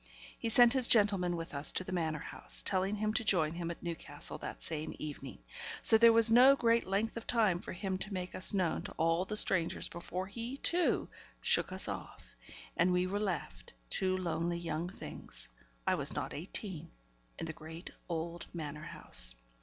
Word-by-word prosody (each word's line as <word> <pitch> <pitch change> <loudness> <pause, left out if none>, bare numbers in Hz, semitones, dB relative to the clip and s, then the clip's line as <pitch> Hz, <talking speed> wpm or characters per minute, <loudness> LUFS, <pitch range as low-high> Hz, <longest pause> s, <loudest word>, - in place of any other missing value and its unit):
He 230 - -2
sent 240 +1 +6
his 260 -3 +4
gentleman 200 -5 +3
with 165 -1 -6
us 140 +1 +3
to - - +2
the 185 - -8
Manor 160 -4 -1
House, - - -5
telling 195 +1 +1
him 215 +1 -1
to 230 - 0
join 165 -7 +2
him 170 0 -4
at 170 - -8
Newcastle 170 -2 -5
that - - -8
same 155 -1 -4
evening; 140 -4 -7 0.5
so - - +8
there 230 +1 +7
was 230 0 +6
no 255 +4 +7
great 230 -4 +2
length 205 +4 -1
of 230 - -8
time 215 -7 +2
for - - -8
him 190 0 -4
to 205 +2 -4
make 185 -1 -5
us 185 - +6
known 185 -5 0
to - - -8
all 165 +3 +1
the 210 +2 -2
strangers 170 -5 +3
before 180 +2 -5
he, 230 +6 -6
too, 345 +4 +1 0.3
shook - - +2
us - - +1
off; - - -7 0.5
and 175 +2 +2
we 180 0 +2
were 200 +2 -2
left, 190 - -4 0.2
two 185 -1 +1
lonely 170 -1 -2
young 170 0 -4
things - - -6 0.4
(I - - +2
was - - +1
not - - -4
eighteen) 180 +1 -4 0.5
in - - -4
the 160 - -5
great 160 +3 -10 0.2
old 170 0 -4
Manor 150 -2 -6
House. - - +2
185 Hz, 190 wpm, -33 LUFS, 165-210 Hz, 0.5 s, so